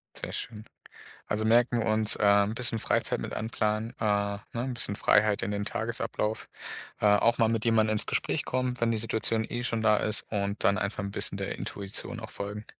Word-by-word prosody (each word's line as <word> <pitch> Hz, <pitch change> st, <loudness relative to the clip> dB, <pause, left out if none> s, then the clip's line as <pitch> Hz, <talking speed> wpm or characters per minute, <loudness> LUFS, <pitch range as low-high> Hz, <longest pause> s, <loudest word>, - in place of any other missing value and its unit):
Sehr -, -, -5 dB
schön. 110 Hz, -1 st, -4 dB, 0.6 s
Also 110 Hz, +1 st, -1 dB
merken 120 Hz, +2 st, +3 dB
wir 110 Hz, -, -1 dB
uns, 110 Hz, 0 st, +4 dB
ähm, 100 Hz, 0 st, +4 dB
bisschen 115 Hz, -1 st, 0 dB
Freizeit -, -, 0 dB
mit -, -, -5 dB
einplanen 110 Hz, 0 st, -2 dB
äh, -, -, -4 dB
ne, 100 Hz, -1 st, 0 dB
'n 125 Hz, +2 st, -2 dB
bisschen 110 Hz, -4 st, -1 dB
Freiheit 105 Hz, +1 st, +3 dB
in 105 Hz, -, -2 dB
den 100 Hz, 0 st, -2 dB
Tagesablauf 110 Hz, -1 st, -2 dB, 0.5 s
äh, -, -, 0 dB
auch 105 Hz, +3 st, +4 dB
mal 115 Hz, -, +4 dB
mit 115 Hz, 0 st, -1 dB
jemand 110 Hz, -2 st, +3 dB
ins 110 Hz, -1 st, +1 dB
Gespräch -, -, 0 dB
kommen, 130 Hz, 0 st, -1 dB
wenn 115 Hz, 0 st, +2 dB
die 115 Hz, -, 0 dB
Situation 110 Hz, 0 st, +1 dB
eh 120 Hz, 0 st, -3 dB
schon 115 Hz, -2 st, -1 dB
da 105 Hz, -1 st, +4 dB
ist, 105 Hz, +1 st, +3 dB
und 100 Hz, -1 st, -2 dB
dann 100 Hz, -, +3 dB
einfach 100 Hz, 0 st, -3 dB
'n 100 Hz, -, -4 dB
bisschen -, -, -1 dB
der -, -, -4 dB
Intuition 100 Hz, +4 st, -5 dB
auch 110 Hz, -, -8 dB
folgen. 105 Hz, +1 st, -6 dB
110 Hz, 200 wpm, -28 LUFS, 105-115 Hz, 0.6 s, uns